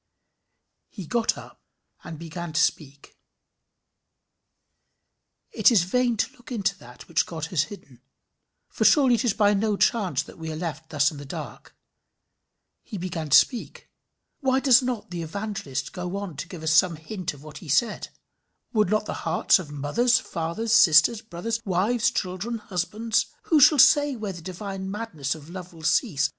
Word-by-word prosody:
"] - - -53
He 190 -6 -9
sat 230 +3 0
up - - -13 0.4
and 160 - -8
began 170 +1 -7
to 155 - +1
speak. 140 -2 -2 2.3
It - - +4
is 205 -7 +4
vain 240 +5 0
to - - -1
look 245 - -16
into 200 -4 -1
that 125 +1 -14
which - - +1
God 160 -2 -5
has 155 -3 +2
hidden; 140 - -13 0.7
for - - -3
surely 270 -5 +5
it 235 - +1
is 235 -5 +1
by 205 -1 +3
no 205 0 0
chance 205 -5 +1
that - - -15
we 160 0 -5
are - - -5
left 160 -2 -5
thus 145 0 +2
in 150 - -10
the 145 - -8
dark. 135 - -9 1.0
"He 215 - -8
began 170 -4 -4
to - - +8
speak." 245 -4 -1 0.5
Why 265 -1 +2
does 265 -2 +5
not 245 -7 -4
the 175 -1 -4
Evangelist 165 -6 -5
go 180 +1 -4
on 200 -5 -6
to 145 - -5
give 175 -4 -9
us 160 0 +1
some 170 +1 +4
hint 165 +1 -6
of 140 - -16
what 155 -1 -10
he 165 - -12
said? 225 - +1 0.7
Would 215 -4 +2
not 215 +1 +1
the - - -4 0.2
hearts - - +3
of 170 -5 -8
mothers, 185 - +1
fathers, 215 +1 -3
sisters, 205 +2 +6
brothers, 225 +3 -4
wives, 215 +5 +1
children, 205 +2 -3
husbands 210 +3 -1 0.2
who 315 - +3
shall 295 +2 +7
say 290 +1 +5
where 215 -4 -5
the 175 - -10
divine 190 +2 -6
madness 180 - -4
of 155 +1 -13
love 180 -1 -9
will 160 -1 -14
cease? 160 - +2
185 Hz, 175 wpm, -25 LUFS, 160-225 Hz, 2.3 s, to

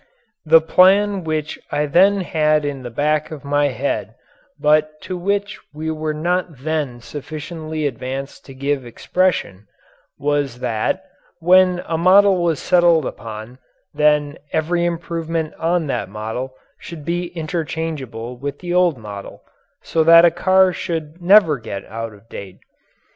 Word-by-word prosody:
The 160 +1 +7
plan 195 +3 +4
which 155 -1 -3
I 150 0 +1
then 195 +7 +4
had 155 -3 +1
in 140 -2 -4
the 125 - -6
back 150 +5 0
of 155 -3 -9
my 145 0 +2
head 110 -5 -3 0.4
but 155 +1 +2
to 185 - -5
which 200 +3 -2 0.2
we 160 +1 -3
were 155 0 -2
not 175 0 -1
then 150 -6 -2
sufficiently 155 +3 -6
advanced 135 +1 -5
to 135 - -11
give 140 0 -1
expression, 120 - -1 0.5
was 145 -3 -1
that, 120 +10 -1 0.4
when 180 +1 +4
a 165 -1 -2
model 190 +1 +5
was 165 -4 0
settled 170 -4 +3
upon 110 +3 -8 0.3
then 150 -1 +2
every 170 +2 0
improvement 165 -2 -3
on 170 0 +1
that 140 - -3
model 110 +5 -5 0.2
should 155 -4 -9
be 175 +1 -1
interchangeable 155 -8 -4
with 140 +1 -4
the 175 -1 -5
old 180 -5 +3
model, 105 -3 -9 0.4
so 160 - +1
that 165 +1 +8
a 170 - +5
car 185 +2 +3
should 165 -1 -5
never 175 -6 +5
get 100 -3 -7
out 115 0 -6
of 105 +2 -21
date. 95 -4 -9
155 Hz, 145 wpm, -20 LUFS, 135-175 Hz, 0.5 s, that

